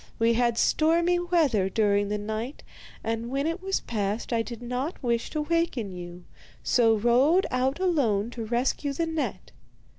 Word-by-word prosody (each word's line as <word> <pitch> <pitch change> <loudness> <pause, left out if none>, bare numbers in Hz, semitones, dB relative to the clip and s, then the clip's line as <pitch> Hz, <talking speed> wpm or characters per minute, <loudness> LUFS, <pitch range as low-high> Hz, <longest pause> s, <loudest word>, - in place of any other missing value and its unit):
We 230 +1 +3
had 235 0 +1
stormy 335 +5 +3
weather 310 - +2
during 205 -1 +1
the 210 - -1
night, 220 +6 -5 0.4
and 225 +1 -2
when 275 +2 -1
it 330 +3 -2
was 385 0 -1
past 210 +1 -3
I 230 - +2
did 235 0 -7
not 250 +7 -4
wish 235 -1 0
to 305 - -2
waken 300 - -1
you, 175 0 -9 0.4
so 230 -2 +4
rowed 255 - +3
out 260 +4 0
alone 240 - +1
to 235 -2 -5
rescue 250 +5 -1
the 330 +4 -1
net. 320 -2 -4
240 Hz, 160 wpm, -26 LUFS, 220-310 Hz, 0.4 s, so